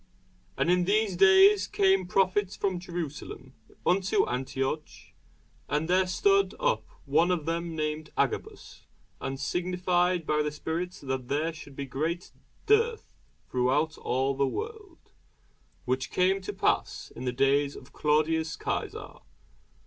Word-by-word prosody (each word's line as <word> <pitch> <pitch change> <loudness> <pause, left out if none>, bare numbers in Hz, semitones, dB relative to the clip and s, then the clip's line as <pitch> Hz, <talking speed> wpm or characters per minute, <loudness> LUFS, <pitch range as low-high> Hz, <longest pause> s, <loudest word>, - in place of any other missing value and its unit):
And 175 - +2
in 180 0 +3
these 205 0 +2
days 195 +2 +6
came 190 -2 +2
prophets 195 +1 +1
from 190 -3 -1
Jerusalem 170 -4 -6 0.3
unto 185 +1 +2
Antioch. 135 +4 -2 0.8
And 150 +2 0
there 185 +1 +3
stood 395 - +2
up - - 0 0.2
one 155 +5 +3
of 175 -5 0
them 165 0 -2
named 155 0 -3
Agabus, - - -3 0.3
and 135 0 -4
signified 180 +2 0
by 150 0 +1
the 150 - 0
Spirit 165 +4 -3
that 130 -2 -3
there 150 +5 -1
should 145 -3 -12
be 140 - -4
great 160 +7 -3 0.3
dearth 450 +1 +2 0.3
throughout 135 +6 +1
all 135 +2 0
the 140 0 +1
world: 430 - -7 0.7
which 130 +2 -1
came 190 +2 +2
to 185 - -4
pass - - -1
in 125 - -6
the 125 - 0
days 140 +2 +2
of 130 - -13
Claudius 155 +1 +1
Cæsar. - - -4
165 Hz, 135 wpm, -28 LUFS, 145-190 Hz, 0.8 s, days